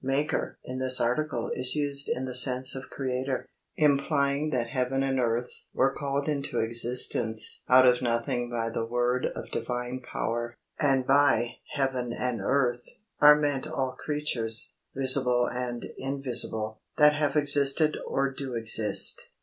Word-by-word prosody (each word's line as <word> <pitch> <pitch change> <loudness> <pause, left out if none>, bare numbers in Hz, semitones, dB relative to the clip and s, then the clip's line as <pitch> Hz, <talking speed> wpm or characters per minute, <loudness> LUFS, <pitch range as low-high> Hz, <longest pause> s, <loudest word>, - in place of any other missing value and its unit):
"Maker" 135 +3 -2
in 130 0 -6
this 130 0 +3
article 150 +7 -1
is 130 +2 +1
used 140 -1 -2
in 130 - -2
the 130 - -6
sense 125 0 +3
of 135 0 -8
Creator, 130 0 -3 0.3
implying 140 0 +1
that 120 -5 -2
heaven 130 +1 -1
and 135 -1 -1
earth 120 0 -1 0.2
were 135 +1 +2
called 140 0 -3
into 140 -5 -3
existence 115 -1 +1
out 130 0 +7
of 125 0 +3
nothing 120 0 -2
by 115 -1 -3
the 115 - -3
word 120 +2 -1
of - - -8
Divine 125 +2 -4
power; 120 -1 -4 0.2
and 135 -3 +1
by 135 -4 +2 0.2
"heaven 130 -4 -2
and 125 -2 -3
earth" 125 -3 0 0.4
are 150 0 +8
meant 145 -2 -2
all 135 -4 -3
creatures, 125 -5 -2 0.2
visible 130 -2 +5
and 125 -1 -5
invisible, 120 -5 -1 0.2
that 150 -1 +6
have 145 -1 -1
existed 145 +1 +3
or 135 0 -1
do 130 -2 -6
exist. 110 -2 +2
130 Hz, 145 wpm, -27 LUFS, 120-140 Hz, 0.4 s, are